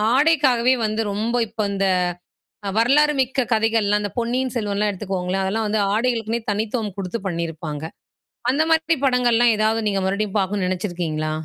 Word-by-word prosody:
ஆடைக்காகவே 265 Hz, -4 st, +3 dB
வந்து 215 Hz, +1 st, -1 dB
ரொம்ப 225 Hz, +4 st, -1 dB
இப்ப 215 Hz, -1 st, -2 dB
இந்த 195 Hz, 0 st, +1 dB, 0.8 s
அ -, -, 0 dB
வரலாறு 295 Hz, +6 st, +4 dB
மிக்க 260 Hz, 0 st, 0 dB
கதைகள்லாம். 220 Hz, -2 st, +1 dB
இந்த 205 Hz, -, -3 dB
பொன்னியின் 245 Hz, +2 st, -1 dB
செல்வன்லாம் 210 Hz, -1 st, 0 dB
எடுத்துக்குகோங்களேன், 190 Hz, -1 st, -2 dB
அதெல்லாம் 220 Hz, +3 st, -1 dB
வந்து 215 Hz, +1 st, +1 dB, 0.2 s
ஆடைகளுக்குன்னே 230 Hz, -1 st, 0 dB
தனித்துவம் 215 Hz, 0 st, -2 dB
குடுத்து 190 Hz, +4 st, -3 dB
பண்ணியிருப்பாங்க. 165 Hz, -3 st, -4 dB, 0.7 s
அந்த 290 Hz, +4 st, +2 dB
மாதிரி 325 Hz, +1 st, +3 dB
படங்கள்லாம் 240 Hz, -2 st, +3 dB
ஏதாவது 220 Hz, +1 st, +2 dB
நீங்க 195 Hz, -1 st, 0 dB
மறுபடியும் 200 Hz, +1 st, -1 dB
பார்க்கணும்னு 190 Hz, -1 st, -1 dB
நினைச்சிருக்கீங்களா? 175 Hz, -5 st, -2 dB
215 Hz, 140 wpm, -22 LUFS, 195-240 Hz, 0.8 s, வரலாறு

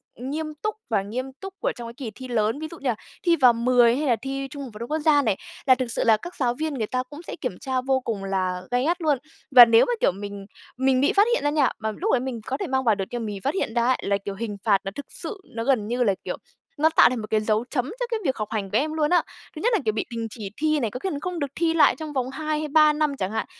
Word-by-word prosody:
nghiêm 305 Hz, +5 st, -4 dB
túc 430 Hz, 0 st, -1 dB
và 215 Hz, -4 st, +2 dB
nghiêm 225 Hz, +6 st, -4 dB, 0.2 s
túc 390 Hz, 0 st, -7 dB
của -, -, 0 dB
trong 240 Hz, -1 st, -7 dB
cái 230 Hz, -, -8 dB
kỳ 240 Hz, -2 st, -6 dB
thi 260 Hz, -, -8 dB
lớn. 225 Hz, +1 st, 0 dB
Ví 315 Hz, -, -4 dB
dụ 335 Hz, -, -9 dB
như 275 Hz, -, -1 dB
là 235 Hz, -, +1 dB, 0.3 s
thi 345 Hz, -2 st, +4 dB
vào 255 Hz, -6 st, +6 dB
10 240 Hz, 0 st, +4 dB
hay 295 Hz, +2 st, -1 dB
là 240 Hz, -, +4 dB
thi 270 Hz, 0 st, -3 dB
Trung 285 Hz, 0 st, -6 dB
học 260 Hz, -, -8 dB
phổ 210 Hz, -, -10 dB
thông 235 Hz, -, -6 dB
quốc 310 Hz, -, +1 dB
gia 295 Hz, -1 st, +4 dB
này, 215 Hz, -7 st, 0 dB, 0.3 s
là 260 Hz, -, +6 dB
thực 255 Hz, 0 st, -2 dB
sự -, -, 0 dB
là 225 Hz, -1 st, +5 dB
các 350 Hz, +9 st, -9 dB
giáo 245 Hz, -3 st, +1 dB
viên 310 Hz, +4 st, -3 dB
người 225 Hz, -6 st, -2 dB
ta 255 Hz, +2 st, -1 dB
cũng 295 Hz, +3 st, -9 dB
sẽ -, -, -5 dB
kiểm -, -, -3 dB
tra 260 Hz, -2 st, -1 dB
vô 265 Hz, 0 st, +1 dB
cùng 225 Hz, -6 st, -4 dB
là 185 Hz, -2 st, -1 dB
gay 245 Hz, +1 st, +2 dB
gắt 345 Hz, +3 st, 0 dB
luôn. 300 Hz, -4 st, +2 dB, 0.3 s
Và 250 Hz, -2 st, +11 dB
nếu 230 Hz, 0 st, +5 dB
mà, -, -, 0 dB
kiểu, -, -, +4 dB
mình 200 Hz, +1 st, -7 dB, 0.3 s
mình 260 Hz, 0 st, +2 dB
bị 285 Hz, -, +3 dB
phát 405 Hz, +2 st, +5 dB
hiện 485 Hz, -, 0 dB
ra 290 Hz, -, +2 dB
nha, 295 Hz, -3 st, +3 dB
mà 220 Hz, 0 st, -2 dB
lúc 380 Hz, -, -2 dB
đấy 250 Hz, -, +4 dB
mình 250 Hz, -3 st, -4 dB
có 265 Hz, -, -1 dB
thể 380 Hz, -, -3 dB
mang 265 Hz, -2 st, 0 dB
vào 225 Hz, -4 st, +3 dB
được 195 Hz, -1 st, -3 dB
nhưng 240 Hz, -, -3 dB
mà -, -, -3 dB
mình 210 Hz, -1 st, -4 dB
bị -, -, -6 dB
phát 275 Hz, +9 st, -1 dB
hiện 305 Hz, -12 st, -2 dB
ra 235 Hz, 0 st, +2 dB
ấy, 255 Hz, -, +3 dB
là, 200 Hz, 0 st, +1 dB
kiểu, 200 Hz, -, -4 dB
hình 210 Hz, -1 st, -4 dB
phạt 205 Hz, -3 st, +4 dB
nó 195 Hz, -, -4 dB
thực 285 Hz, -, -6 dB
sự 425 Hz, -, -6 dB, 0.2 s
nó 230 Hz, -, -2 dB
gần 230 Hz, -5 st, +1 dB
như 245 Hz, +2 st, +1 dB
là, 205 Hz, -4 st, +3 dB
kiểu, -, -, -4 dB, 0.4 s
nó 310 Hz, +2 st, +4 dB
tạo -, -, +8 dB
thành 250 Hz, -1 st, -3 dB
một 215 Hz, -, -6 dB
cái 215 Hz, -, +2 dB
dấu 215 Hz, +2 st, +1 dB
chấm 250 Hz, -4 st, 0 dB
cho -, -, 0 dB
cái 455 Hz, -, 0 dB
việc 265 Hz, -, +1 dB
học 215 Hz, -, -3 dB
hành 200 Hz, -3 st, -3 dB
của 210 Hz, -, +3 dB
em 310 Hz, +4 st, 0 dB
luôn 305 Hz, -1 st, +1 dB
á. 355 Hz, -, +4 dB, 0.3 s
Thứ 310 Hz, -, -6 dB
nhất 485 Hz, +2 st, +2 dB
là, 435 Hz, -, +3 dB
kiểu, 215 Hz, -, +2 dB
bị 220 Hz, -, -2 dB
đình 230 Hz, -1 st, -3 dB
chỉ 210 Hz, -3 st, -6 dB
thi 310 Hz, -1 st, +2 dB
này, 230 Hz, -6 st, -1 dB
có 250 Hz, -, -5 dB
khi 380 Hz, -, -2 dB
còn 290 Hz, -, -3 dB
không 360 Hz, +1 st, -4 dB
được 285 Hz, -3 st, -3 dB
thi 330 Hz, -1 st, +1 dB
lại 325 Hz, -, +5 dB
trong 310 Hz, -2 st, -7 dB
vòng 260 Hz, -2 st, -1 dB
2 305 Hz, +2 st, -2 dB
hay 310 Hz, -, -3 dB
3 305 Hz, 0 st, +5 dB
năm 300 Hz, -2 st, 0 dB
chẳng 190 Hz, -3 st, -2 dB
hạn. 220 Hz, 0 st, -2 dB
255 Hz, 325 wpm, -24 LUFS, 225-300 Hz, 0.4 s, Và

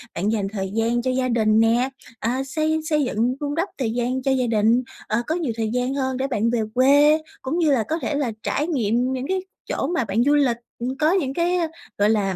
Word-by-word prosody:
bạn 195 Hz, +5 st, 0 dB
dành 210 Hz, -3 st, 0 dB
thời 190 Hz, -2 st, -3 dB
gian 230 Hz, +2 st, +1 dB
cho 255 Hz, +1 st, 0 dB
gia 255 Hz, 0 st, 0 dB
đình 220 Hz, -2 st, +3 dB
nè, 235 Hz, +3 st, +3 dB, 0.3 s
à, 250 Hz, +4 st, -1 dB
xây 310 Hz, +3 st, 0 dB
xây 300 Hz, -2 st, +2 dB
dựng, 245 Hz, 0 st, 0 dB
vun 290 Hz, 0 st, -3 dB
đắp 335 Hz, +5 st, -1 dB
thời 245 Hz, -5 st, -1 dB
gian 245 Hz, +2 st, -1 dB
cho 270 Hz, -, +1 dB
gia 255 Hz, -2 st, +1 dB
đình, 225 Hz, +2 st, +3 dB, 0.2 s
ờ, 215 Hz, +2 st, +1 dB
có 320 Hz, -, 0 dB
nhiều 315 Hz, -9 st, -2 dB
thời 220 Hz, -1 st, -1 dB
gian 250 Hz, +1 st, 0 dB
hơn 260 Hz, -2 st, -1 dB
để 265 Hz, +1 st, -1 dB
bạn 230 Hz, -4 st, 0 dB
về 235 Hz, -1 st, +1 dB
quê, 285 Hz, +5 st, +5 dB, 0.2 s
cũng 270 Hz, +6 st, -2 dB
như 325 Hz, -4 st, +3 dB
là 250 Hz, -5 st, +3 dB
có 320 Hz, +10 st, -2 dB
thể 295 Hz, -, -2 dB
là 280 Hz, -5 st, 0 dB
trải 295 Hz, -, -1 dB
nghiệm 245 Hz, -4 st, +1 dB
những 260 Hz, +1 st, -3 dB
cái 380 Hz, 0 st, 0 dB, 0.3 s
chỗ -, -, -1 dB
mà 340 Hz, -7 st, 0 dB
bạn 215 Hz, +3 st, +1 dB
du 290 Hz, +3 st, +3 dB
lịch, 265 Hz, -5 st, +2 dB, 0.2 s
ừm, 255 Hz, +3 st, -3 dB
có 310 Hz, +1 st, +3 dB
những 315 Hz, -8 st, 0 dB
cái 345 Hz, +3 st, +1 dB, 0.4 s
gọi 205 Hz, +1 st, +3 dB
là, 200 Hz, -3 st, +1 dB
255 Hz, 245 wpm, -23 LUFS, 225-290 Hz, 0.4 s, quê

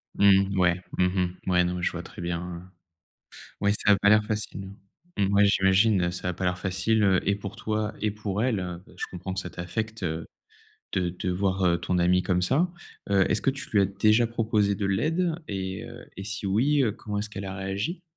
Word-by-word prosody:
Mmh, 100 Hz, -1 st, +4 dB
ouais. 90 Hz, 0 st, +3 dB, 0.2 s
Mmh 90 Hz, -, +3 dB
mh, 90 Hz, -1 st, -1 dB
ouais, 90 Hz, 0 st, +4 dB
non, 90 Hz, 0 st, -1 dB
mais 90 Hz, -, -4 dB
je -, -, +1 dB
vois 85 Hz, 0 st, -6 dB
très -, -, -10 dB
bien, 85 Hz, 0 st, -2 dB
hein. 90 Hz, +1 st, -8 dB, 0.9 s
Ouais, 100 Hz, 0 st, +3 dB
ça 105 Hz, -, +2 dB
a -, -, +5 dB
pas 100 Hz, +1 st, +3 dB
l'air 105 Hz, 0 st, +6 dB
facile. 105 Hz, -2 st, -4 dB, 0.5 s
Mmh, 100 Hz, -1 st, +2 dB
ouais, 100 Hz, 0 st, +6 dB
j'imagine, 95 Hz, -1 st, +3 dB
ça 90 Hz, +1 st, -3 dB
a -, -, -1 dB
pas 95 Hz, +2 st, -4 dB
l'air 90 Hz, 0 st, 0 dB
facile, 95 Hz, +4 st, +1 dB
heu 95 Hz, -2 st, +4 dB
et 100 Hz, -, +3 dB
pour 100 Hz, -1 st, -7 dB
toi 105 Hz, -1 st, -2 dB
et 105 Hz, 0 st, +1 dB
pour 105 Hz, 0 st, -3 dB
elle. 95 Hz, -8 st, -1 dB, 0.2 s
Je -, -, -2 dB
comprends 95 Hz, +1 st, -5 dB
que 95 Hz, -, -2 dB
ça 90 Hz, -, -5 dB
t'affecte 110 Hz, +5 st, -4 dB
de 80 Hz, -1 st, -3 dB, 0.9 s
de 90 Hz, -, -1 dB
voir, 95 Hz, +1 st, 0 dB
heu, 85 Hz, -1 st, +3 dB
ton 90 Hz, +1 st, -1 dB
amie 90 Hz, +1 st, +3 dB
comme 90 Hz, 0 st, +1 dB
ça, 140 Hz, -, +2 dB, 0.4 s
heu, 95 Hz, -1 st, +4 dB
est-ce 105 Hz, -, +2 dB
que -, -, 0 dB
tu 135 Hz, 0 st, -8 dB
lui 105 Hz, -, +4 dB
as 100 Hz, -, +4 dB
déjà 105 Hz, +4 st, +3 dB
proposé 110 Hz, -3 st, +1 dB
de 100 Hz, -, -3 dB
l'aide 160 Hz, -, +1 dB
et 95 Hz, -1 st, -4 dB
heu -, -, -11 dB
et 95 Hz, -, -6 dB
si 105 Hz, 0 st, -4 dB
oui, 135 Hz, +9 st, +3 dB
heu, 115 Hz, -5 st, +1 dB
comment 105 Hz, -2 st, -5 dB
est-ce 105 Hz, +1 st, -3 dB
qu'elle 100 Hz, -1 st, -6 dB
a 95 Hz, -, -5 dB
réagi? 100 Hz, -, -3 dB
95 Hz, 220 wpm, -26 LUFS, 90-105 Hz, 0.9 s, l'air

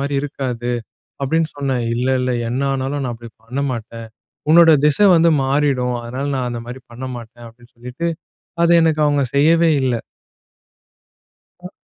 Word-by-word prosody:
மாதிரி 140 Hz, 0 st, -2 dB
இருக்காது." 125 Hz, -4 st, -4 dB, 0.5 s
அப்படின்னு 160 Hz, +3 st, 0 dB
சொன்னேன். 135 Hz, -4 st, -1 dB
"இல்ல, 125 Hz, +2 st, -1 dB
இல்ல 125 Hz, 0 st, -1 dB, 0.2 s
என்ன 130 Hz, +3 st, -2 dB
ஆனாலும் 135 Hz, +1 st, -2 dB
நான் 120 Hz, -, -3 dB
அப்டி 115 Hz, 0 st, -11 dB, 0.2 s
பண்ண 130 Hz, +4 st, -3 dB
மாட்டேன். 115 Hz, -1 st, -7 dB, 0.4 s
உன்னோட 165 Hz, 0 st, +7 dB
திசை 150 Hz, +8 st, +4 dB
வந்து 165 Hz, 0 st, +4 dB
மாறிடும். 135 Hz, -3 st, 0 dB
அதனால 125 Hz, +4 st, -5 dB
நான் 125 Hz, -1 st, -2 dB
அந்த 120 Hz, -1 st, -5 dB
மாரி 125 Hz, +2 st, -8 dB
பண்ண 125 Hz, +2 st, -7 dB
மாட்டேன்." 120 Hz, 0 st, -11 dB
அப்டின்னு 120 Hz, +2 st, -19 dB
சொல்லிட்டு 125 Hz, +8 st, -5 dB, 0.6 s
அதை 170 Hz, -, +4 dB
எனக்கு 160 Hz, -1 st, +1 dB
அவுங்க 145 Hz, -1 st, +2 dB
செய்யவே 165 Hz, +3 st, +4 dB
இல்லை. 125 Hz, -3 st, 0 dB, 1.7 s
அ. -, -, -7 dB
130 Hz, 150 wpm, -19 LUFS, 120-145 Hz, 1.7 s, உன்னோட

